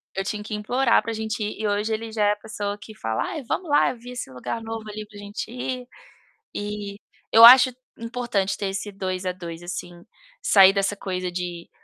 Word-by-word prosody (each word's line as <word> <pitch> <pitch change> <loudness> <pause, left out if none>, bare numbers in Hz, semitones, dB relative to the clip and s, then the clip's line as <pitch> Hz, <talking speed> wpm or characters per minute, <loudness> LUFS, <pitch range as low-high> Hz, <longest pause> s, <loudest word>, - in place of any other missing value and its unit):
eu 195 - -1
tinha 210 +1 -4
que 215 - -7
implorar 235 +4 +2
para 230 - -4
a - - -3
gente 220 0 -3
ir 210 - -4
e 215 - 0
hoje 210 +2 0
ele 225 +1 -4
já 215 -1 +1
é - - +4
a - - -6
pessoa 205 -1 -4
que 220 - -11
fala: 110 0 -1
"Ai 305 - -5
vamos 325 +7 -3
lá, 290 - +4
eu - - -10
vi 245 +2 -10
esse 250 - -6
lugar 130 - -5
novo, 225 -1 -6
ali, 215 0 -6
para 205 0 -14
a - - -9
gente 205 +1 -6
ir". 250 0 -4 0.7
Eh, 205 -1 -4 0.4
eu 225 +1 +10
acho 255 +1 +10 0.3
importante 230 -4 -2
ter 200 - -2
esse 195 +2 -4
2 185 -1 -4
a 185 - +1
2, 170 -2 -8
assim, 175 0 -5 0.5
sair 195 -1 +7
dessa 195 +1 0
coisa 185 -2 -3
de: 175 -1 -5
210 Hz, 225 wpm, -24 LUFS, 195-230 Hz, 0.7 s, eu